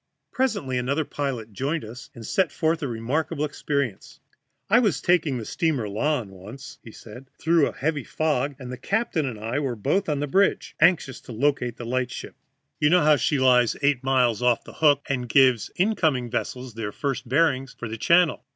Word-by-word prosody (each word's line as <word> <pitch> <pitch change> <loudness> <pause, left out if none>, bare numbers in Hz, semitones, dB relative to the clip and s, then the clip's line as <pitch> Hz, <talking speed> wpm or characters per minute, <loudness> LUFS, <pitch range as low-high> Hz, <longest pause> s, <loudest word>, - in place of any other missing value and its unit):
Presently 200 - -1
another 140 +5 -1
pilot 125 -7 -4
joined 140 +6 -2
us, 120 +4 -10
and 115 -2 -9
set 185 - +1
forth 160 +1 0
a 145 - -2
remarkable 135 +6 -2
experience. 140 -6 -3 0.5
"I 230 +4 +5
was 200 - +1
taking 160 -5 +1
the 115 - -6
steamer 145 -8 -1
Lahn 115 +2 -1
once," 105 +9 -11
said 125 +5 -12
he, - - -21
"through 165 -2 +4
a - - -4
heavy 150 -1 -2
fog, 145 0 -1
and 125 -2 -8
the 125 - -6
captain 200 - -1
and 115 -5 -6
I 115 +6 -2
were 135 -4 -2
both 155 - 0
on 145 -2 0
the 145 - -1
bridge, 195 +7 +1
anxious 165 -5 +2
to 120 - -10
locate 125 -1 0
the 120 - -7
light 125 +1 -1
ship. - - -8 0.5
You 150 - +3
know 155 -3 +5
she 145 +2 0
lies 125 -3 +4
eight 140 -3 +2
miles 125 -4 +2
off 125 -1 +2
the - - -12
Hook, 145 -3 +3
and 125 -3 -2
gives 130 -3 +4
incoming 160 - +1
vessels 125 0 -4
their 110 -2 -4
first 135 0 -4
bearings 135 -2 +1
for 120 - -5
the 110 - -5
channel. 170 +4 +3
135 Hz, 190 wpm, -24 LUFS, 120-155 Hz, 0.5 s, I